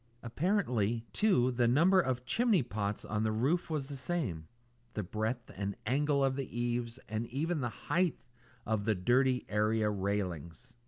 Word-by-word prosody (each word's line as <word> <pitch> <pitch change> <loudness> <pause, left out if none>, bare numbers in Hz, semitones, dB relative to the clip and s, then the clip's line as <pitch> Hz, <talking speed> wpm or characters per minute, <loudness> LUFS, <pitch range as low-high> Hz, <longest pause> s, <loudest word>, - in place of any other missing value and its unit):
Apparently, 120 - 0
too, 155 - +3
the 120 -1 +2
number 170 +10 +5
of 125 -5 -2
chimney 225 - +3
pots 105 -3 -3
on 105 0 -1
the 110 0 +1
roof 135 +13 +1
was 150 -4 -2
the 140 - -5
same; 130 - -3 0.5
the 105 - -1
breadth 110 +5 -3
and 100 +1 -3
angle 140 +4 +2
of 135 -1 +2
the 130 -3 -4
eaves; 120 0 -1
and 110 +2 -3
even 155 +5 -1
the 120 - -1
height 175 +8 0 0.5
of 110 -2 -1
the 110 -1 +2
dirty 125 +6 +2
area 105 0 +1
railings. 100 - -3
120 Hz, 160 wpm, -32 LUFS, 105-140 Hz, 0.5 s, number